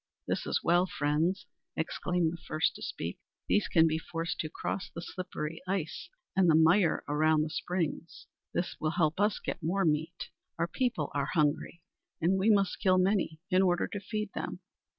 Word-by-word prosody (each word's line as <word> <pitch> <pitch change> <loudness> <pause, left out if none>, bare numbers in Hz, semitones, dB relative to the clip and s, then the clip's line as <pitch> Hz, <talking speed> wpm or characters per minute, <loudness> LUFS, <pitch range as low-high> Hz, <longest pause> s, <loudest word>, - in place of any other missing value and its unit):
This - - -2
is - - 0
well, 175 +2 +4
friends!" 155 +4 0 0.3
exclaimed 170 +1 0
the 170 - -9
first 155 +1 +1
to - - -12
speak. - - -5 0.3
"These 210 - +2
can 165 -2 +5
be 160 0 +1
forced 165 +1 -4
to 155 - -2
cross 185 - -4
the - - -8
slippery 165 -3 -5
ice 185 -4 -3 0.3
and 190 -2 +4
the 155 - +6
mire 165 +2 +4
around 155 +1 +3
the 155 - -4
springs. 170 0 -3 0.3
This 175 - -2
will 155 - 0
help 160 0 +2
us 205 -1 +3
to - - -8
get - - -3
more 175 +4 +1
meat. 160 +2 -1 0.3
Our 165 +1 +1
people 175 - -1
are 140 -1 0
hungry, 155 +2 0 0.4
and 185 +4 +2
we 200 +4 +3
must 200 -3 +3
kill 185 -1 +4
many 185 -4 +1
in 185 +1 +5
order 175 -2 +2
to 205 - -4
feed 210 +1 -4
them!" - - -5
170 Hz, 185 wpm, -30 LUFS, 160-185 Hz, 0.4 s, the